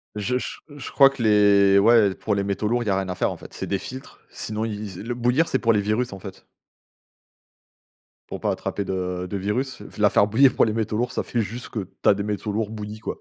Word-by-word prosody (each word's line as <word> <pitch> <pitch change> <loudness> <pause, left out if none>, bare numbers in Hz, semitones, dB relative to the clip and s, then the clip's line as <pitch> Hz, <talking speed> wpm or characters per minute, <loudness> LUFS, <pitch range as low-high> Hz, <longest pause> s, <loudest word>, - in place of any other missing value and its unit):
Je 105 +5 -1
je - - -5 0.2
je 140 - -7
crois 135 -1 +7
que 135 -3 -8
les 100 -2 +5
ouais, 105 -2 +5
pour 110 - -2
les 100 - 0
métaux 100 +1 -2
lourds, 120 +2 0
il - - -8
y - - +1
a 95 - +2
rien 95 -1 -3
à 90 - -3
faire, - - 0
en - - -7
fait, - - -13
c'est - - -5
des 100 - 0
filtres. 130 +6 -9
Sinon, 110 +1 -4
il 105 -4 -6
le 120 +1 -3
bouillir, 125 +7 +2
c'est 130 - 0
pour 115 -1 +3
les 105 - +2
virus, 110 +2 -1
en 95 - -8
fait 95 0 -11 1.8
pour - - -7
pas - - +1
attraper 100 - -3
de-de 90 0 -3
virus, 125 +8 -2 0.2
la 105 -1 +4
faire 100 - +3
bouillir, 125 +5 +4
pour - - +3
les 110 - -1
métaux 110 -1 -2
lourds, 120 +2 -1
ça - - -1
fait 120 - -3
juste 115 +3 -6
que 100 -5 -5 0.2
tu - - +5
as - - +7
des 100 0 -3
métaux 105 0 -3
lourds 110 0 -2
bouillis, 105 0 -7
quoi 110 - -6
105 Hz, 250 wpm, -23 LUFS, 100-120 Hz, 1.8 s, crois